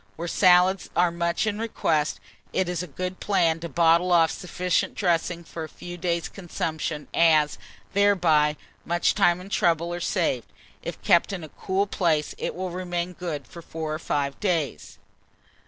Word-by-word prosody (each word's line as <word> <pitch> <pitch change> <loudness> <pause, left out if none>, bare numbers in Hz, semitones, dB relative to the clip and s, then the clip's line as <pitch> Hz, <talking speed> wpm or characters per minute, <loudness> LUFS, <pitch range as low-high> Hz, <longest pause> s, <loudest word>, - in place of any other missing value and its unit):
Where 170 +2 -5
salads 180 +1 +4
are 175 -1 +3
much 170 +3 0
in 210 -1 -1
request, 155 -9 0 0.3
it 185 - +1
is 175 -1 -2
a 180 - -5
good 180 +5 -5
plan 170 -5 +2
to 170 0 -6
bottle 170 +3 +3
off 165 -2 +5
sufficient 180 0 -1
dressing 170 -2 0
for 165 0 -7
a 155 - -7
few 175 +3 -9
days' 170 -1 -1
consumption, 160 -4 -4
as, 155 -3 +4 0.3
thereby, 170 -7 +3 0.3
much 175 +1 +1
time 180 -4 +3
and 190 +2 -11
trouble 170 -1 +1
are 175 - -3
saved. 165 - -1 0.3
If - - -6
kept 170 +4 +4
in 185 -4 -5
a 155 - -8
cool 190 +5 -1
place, 165 -6 0
it - - -3
will 185 0 -4
remain 175 0 -3
good 165 -6 -5
for 170 - -11
4 160 -1 -5
or 155 - -3
5 140 -3 -2
days. 165 - -2
170 Hz, 170 wpm, -25 LUFS, 160-180 Hz, 0.3 s, off